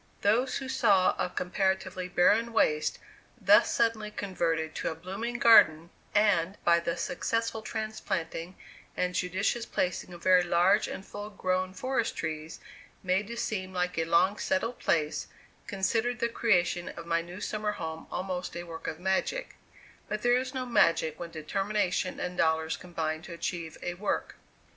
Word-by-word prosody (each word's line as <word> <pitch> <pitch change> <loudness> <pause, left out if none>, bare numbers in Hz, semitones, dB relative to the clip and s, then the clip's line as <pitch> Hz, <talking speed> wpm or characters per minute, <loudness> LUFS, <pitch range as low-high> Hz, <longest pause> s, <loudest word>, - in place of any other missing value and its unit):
Those 230 +6 +2
who 265 - -5
saw 215 -8 +4
a 180 - -1
comparatively 185 0 -1
barren 210 +6 +3
waste 150 -8 +2 0.4
thus - - +5
suddenly 225 -2 +1
converted 165 -6 -2
to - - -2
a 160 - -4
blooming 195 +8 -4
garden, 170 -9 +6 0.2
and, 200 -3 +3
by 170 0 +5
the 170 0 -2
successful 230 +6 -1
transplanting 190 -6 -4 0.4
and 180 0 0
judicious 190 +6 -1
placing 180 0 -2
of 175 -1 -11
very 185 -1 +6
large 175 +4 +3
and 195 - -6
full 205 +1 -7
grown 185 -2 -1
forest 255 -1 -1
trees, 155 0 -4 0.4
made 190 +2 +1
to 235 +1 -6
seem 190 -5 -3
like 180 0 -1
a 165 - +1
long 185 +5 +3
settled 250 -4 -1
place, 155 -2 0 0.4
considered 225 +5 0
the 235 -1 0
creation 175 -7 +1
of 170 - -8
my 170 0 +1
new 175 +3 -9
summer 210 0 -2
home 160 -4 -6
almost 185 -1 -3
a 175 - -4
work 165 -1 -8
of 160 - -4
magic; 190 - -1 0.5
but 210 0 -3
there 245 0 +4
is 255 +1 -1
no 260 -1 -3
magic 165 -9 +2
when 170 - -5
determination 185 +3 -1
and 180 0 -4
dollars 160 0 +2
combine 160 -3 -3
to 175 +1 -9
achieve 170 -1 -4
a 175 - -2
work. 195 +4 -3
185 Hz, 160 wpm, -29 LUFS, 170-215 Hz, 0.5 s, garden